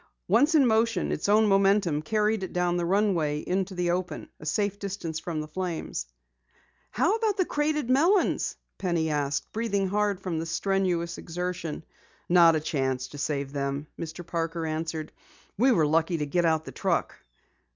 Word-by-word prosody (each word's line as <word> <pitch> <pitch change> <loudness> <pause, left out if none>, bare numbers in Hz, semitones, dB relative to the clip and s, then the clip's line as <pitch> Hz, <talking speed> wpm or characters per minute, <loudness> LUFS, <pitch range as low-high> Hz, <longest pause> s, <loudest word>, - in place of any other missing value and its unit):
Once 280 - +4
in 285 -4 +6
motion 230 0 +2
its - - -2
own 215 +1 +5
momentum 195 -5 +3
carried 215 +5 +1
it 190 - -4
down 180 0 +1
the 175 -1 0
runway 180 -6 +1
into 190 +1 -2
the 175 -1 0
open, 180 0 -3
a - - -10
safe 205 +4 0
distance 185 -6 -4
from 165 -2 -4
the 155 - -4
flames. 165 - -4 0.8
"How 360 - +2
about 445 -3 0
the 370 - +2
crated 295 -3 0
melons?" 330 +10 +2 0.2
Penny 170 -4 0
asked, 145 -1 -1
breathing 200 -4 -1
hard 205 -1 0
from 180 -4 -3
the 165 - -4
strenuous 175 -1 0
exertion. 175 -2 -4 0.4
"Not 170 -2 +6
a - - +2
chance 130 -4 -2
to 145 - -9
save 140 -1 -2
them," 140 0 -2
Mr. 165 +2 -6
Parker 165 0 -2
answered. 160 0 -3 0.4
"We 255 +6 +4
were 165 -10 +4
lucky 165 +3 +2
to 150 - -1
get 175 +4 +1
out 160 -1 +2
the - - -7
truck." - - -1
175 Hz, 170 wpm, -27 LUFS, 160-205 Hz, 0.8 s, in